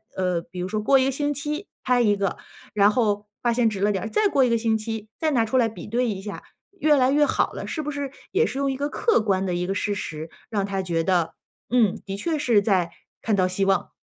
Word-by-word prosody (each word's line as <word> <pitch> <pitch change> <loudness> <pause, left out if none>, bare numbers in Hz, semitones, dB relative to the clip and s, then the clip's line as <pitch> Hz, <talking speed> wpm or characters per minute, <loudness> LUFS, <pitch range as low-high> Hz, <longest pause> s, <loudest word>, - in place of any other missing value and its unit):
呃， 180 -2 0
比 175 +2 -10
如 180 - -2
说 215 +2 -2
过 270 +5 +5
1 260 - +3
个 270 - +1
星 290 +2 -1
期 300 +6 -4 0.2
拍 250 -1 +3
一 210 -3 +3
个， 195 -2 -1 0.4
然 205 0 +5
后 210 -3 +1 0.2
发 240 -1 +2
现 230 -1 +3
直 205 -3 -5
了 210 - +3
点 190 -3 -2
儿， 225 - -4
再 425 - +3
过 275 -6 +3
1 245 - +1
个 230 - +3
星 225 -1 +1
期， 220 -1 -5
再 315 -1 +1
拿 235 -4 +2
出 225 +4 0
来 235 -3 +4
比 220 - -10
对 240 +3 0
一 195 -3 -4
下， 205 0 -7 0.4
越 300 -1 +4
来 255 -1 +4
越 295 +1 +4
好 - - 0
了。 - - -6
是 310 - -3
不 300 - -3
是 285 -2 -4 0.2
也 440 +4 +3
是 270 - -4
用 275 -1 +1
一 265 - -4
个 285 +2 -1
客 455 - +2
观 195 -3 +1
的 180 -2 -1
一 175 - -1
个 195 - 0
事 205 +1 -1
实， 155 -4 -5 0.2
让 205 -3 0
他 195 -1 -2
觉 170 -2 0
得： 170 -3 +1 0.4
“嗯， 230 -6 +3
的 195 0 -4
确 320 +7 -1
是 230 -7 +3
在 185 -5 +1 0.3
看 215 -3 +2
到 185 -1 +3
希 185 +2 0
望。” 195 0 +1
220 Hz, 280 characters per minute, -24 LUFS, 195-265 Hz, 0.4 s, 过